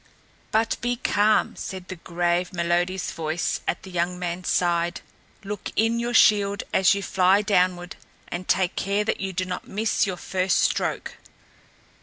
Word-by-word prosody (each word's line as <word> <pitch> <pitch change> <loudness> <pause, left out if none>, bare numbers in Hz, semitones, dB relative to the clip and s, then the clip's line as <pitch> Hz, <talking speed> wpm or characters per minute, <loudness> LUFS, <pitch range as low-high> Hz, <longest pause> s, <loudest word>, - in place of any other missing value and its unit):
"But 225 +1 +1
be 245 +1 0
calm," 215 -3 +2
said 185 -1 -7
the 185 - -6
grave, 175 +1 -1
melodious 175 +2 0
voice 160 +1 -2
at - - -2
the 190 - -10
young 180 0 -1
man's 180 0 -4
side. 175 -1 +1 0.4
"Look 205 +1 -5
in 225 +1 +2
your 240 +1 -2
shield 205 -2 +4
as 190 +1 +4
you 200 - -3
fly 190 +2 +3
downward, 180 -2 +1 0.3
and 180 +1 -6
take 185 -1 +1
care 200 +1 0
that 210 - -1
you 195 -1 -2
do 185 0 -2
not 180 0 -5
miss 215 +1 0
your 185 -2 -3
first 185 +1 0
stroke." - - -1
185 Hz, 160 wpm, -24 LUFS, 175-205 Hz, 0.4 s, shield